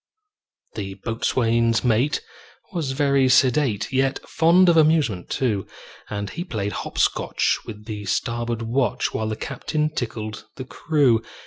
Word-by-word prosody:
The 95 -2 -5
boatswain's 115 +1 +1
mate 125 +4 +2 0.5
was 155 -7 -2
very 140 -2 +2
sedate, 125 -4 +2
Yet 135 +1 +1
fond 175 +3 +4
of 170 - +5
amusement, 150 - +2
too; 110 -7 -1 0.4
And 100 -1 -4
he 175 - -4
played 110 - -3
hop - - -6
scotch - - +1
with 105 -1 -9
the 105 -2 -6
starboard 120 +2 -2
watch, 120 +3 0
While 110 0 -2
the 110 - -2
captain 150 +5 -2
tickled 110 -5 -5
the 130 - -7
crew. 135 -5 +2
120 Hz, 135 wpm, -23 LUFS, 110-140 Hz, 0.5 s, of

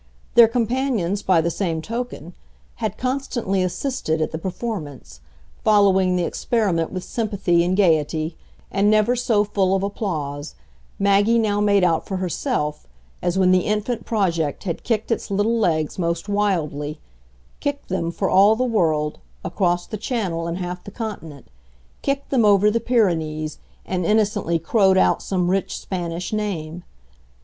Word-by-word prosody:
Their 235 -1 +8
companions, 230 -5 0
by 185 -5 +3
the 170 +1 -1
same 165 -3 -2
token, 220 -3 -5 0.4
had - - -3
constantly 255 -7 -1
assisted 185 - -1
at 155 - -1
the 160 - -4
performance, 170 - -6 0.4
following 190 -3 +4
the 180 - +1
experiment 185 -5 0
with 185 -2 -4
sympathy 200 -6 0
and 180 +2 0
gaiety, 160 -3 +2 0.4
and 200 +1 +2
never 215 +3 +3
so 230 -4 +2
full 195 -2 +1
of 195 - -1
applause, 155 - -4 0.4
Maggie 200 +3 +3
now 205 -2 +1
made 200 -2 +3
out 165 -3 +1
for 190 - -2
herself, 170 - -2 0.3
as 175 +1 0
when 185 -1 +4
the 185 -1 +3
infant 215 +2 -1
project 170 -9 -1
had 175 -5 -4
kicked 225 -1 -1
its 230 - -1
little 210 +4 +1
legs 160 -5 0
most 170 +1 -1
wildly 155 -8 -1 0.6
kicked 285 0 -3
them, 175 -3 -1
for 190 +3 -2
all 200 +4 +5
the 250 - 0
world, 160 -11 0 0.3
across 175 -2 0
the 215 - -6
Channel 190 -7 -2
and 170 +1 -3
half 180 -1 -5
the - - -8
Continent, 195 - -7 0.6
kicked 275 0 -2
them 255 -4 +3
over 205 0 +5
the 230 - +1
Pyrenees 160 - 0 0.3
and 185 -1 -2
innocently 205 -3 +1
crowed 190 +3 +3
out - - +3
some 180 -2 0
rich 195 0 -1
Spanish 175 0 -4
name. 175 -6 -3
190 Hz, 150 wpm, -22 LUFS, 170-215 Hz, 0.6 s, Their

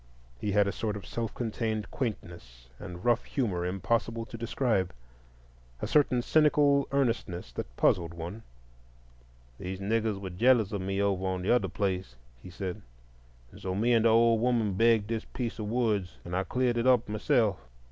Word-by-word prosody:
He 105 - -2
had 105 -1 +4
a - - 0
sort 105 0 -3
of 100 - -9
self 115 -2 -3
contained 110 -2 -2
quaintness 85 - -6
and 90 -1 -8
rough 120 -1 +3
humor 95 -10 -1
impossible 115 +5 -1
to 115 - -10
describe; 115 -4 0 0.9
a - - -3
certain 130 -5 +3
cynical 145 -2 +4
earnestness 115 - -1
that 60 0 -7
puzzled 85 -2 +2
one. 85 +7 -6 1.2
"The 95 +1 -5
niggers 110 +1 0
were 95 -2 -6
jealous 115 +2 +3
of 100 -3 -2
me 95 +1 -2
over 95 -2 0
on 95 -1 -2
the 95 - +1
other 120 -6 +2
place," 95 -7 -2 0.3
he - - -10
said, 95 +2 -5 0.7
"and - - -14
so 95 -1 -3
me 115 +5 +2
and 115 -1 +3
the - - +6
old 115 0 +4
woman 115 -4 +1
begged 115 +1 +3
this 115 0 -3
piece 120 -3 -5
of 105 - -3
woods, 105 -5 0
and 85 +1 -4
I 95 +1 0
cleared 125 -1 0
it 120 - +1
up 125 -2 +4
myself. 105 -1 +1
105 Hz, 175 wpm, -29 LUFS, 95-115 Hz, 1.2 s, the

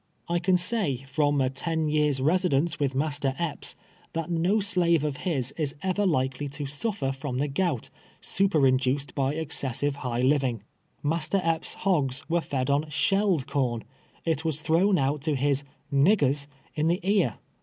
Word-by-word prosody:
I. 175 0 +1
can 180 +1 +3
sav, 180 - +1
from 145 +1 +1
a 130 -1 +1
ten 160 +3 -2
years' 150 -3 +1
residence 165 0 +2
witli 140 -3 -1
Master 140 -1 -1
Epps, 165 -4 -4 0.4
tliat 165 +1 -2
no 175 +5 +2
slave 180 -6 +3
of 150 +4 -3
Lis 135 -7 -1
is 145 -3 -1
ever 190 +2 +1
likely 130 -3 0
to 140 +2 -5
sufier 145 +1 -1
from 135 -2 -4
tlie 140 +1 -1
gont, 165 -7 -1 0.3
snperinduced 140 -7 +2
by 135 +1 0
excessive 145 -3 -1
liigli 125 -1 0
living. 130 -7 +1 0.4
Master 160 +5 +1
Epps' 165 -1 +1
hogs 145 -10 +1
were 170 +1 +1
fed 135 -3 -1
on 145 +2 +1
shelled 195 -2 +2
corn 120 -5 -1 0.2
— - - -32
it 160 -2 0
was 160 -2 0
thrown 180 +5 +3
out 140 +1 0
to 155 0 0
his 140 +1 +1 0.3
"niggers" 140 -2 +3 0.3
in 155 0 0
the 175 +2 +2
ear. 195 - +2
150 Hz, 165 wpm, -27 LUFS, 135-170 Hz, 0.4 s, can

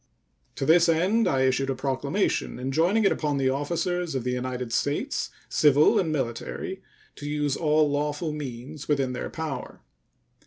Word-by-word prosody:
To 135 - -2
this 170 +2 +5
end 190 +8 +3
I 135 -1 +2
issued 130 +1 +2
a 135 - 0
proclamation 135 +8 -1
enjoining 160 - +1
it - - +5
upon 145 -2 -1
the 130 -1 +2
officers 170 +3 -1
of 130 - -1
the 125 - -1
United 125 -1 -3
States, 145 +3 -1 0.2
civil 150 0 +4
and 165 -4 0
military, 140 +7 -3 0.4
to 145 - -6
use 150 -2 0
all 155 -1 +3
lawful 150 +2 -1
means 145 0 -7
within 135 -4 +1
their 125 - -4
power. 160 -4 -6
145 Hz, 155 wpm, -26 LUFS, 130-160 Hz, 0.4 s, this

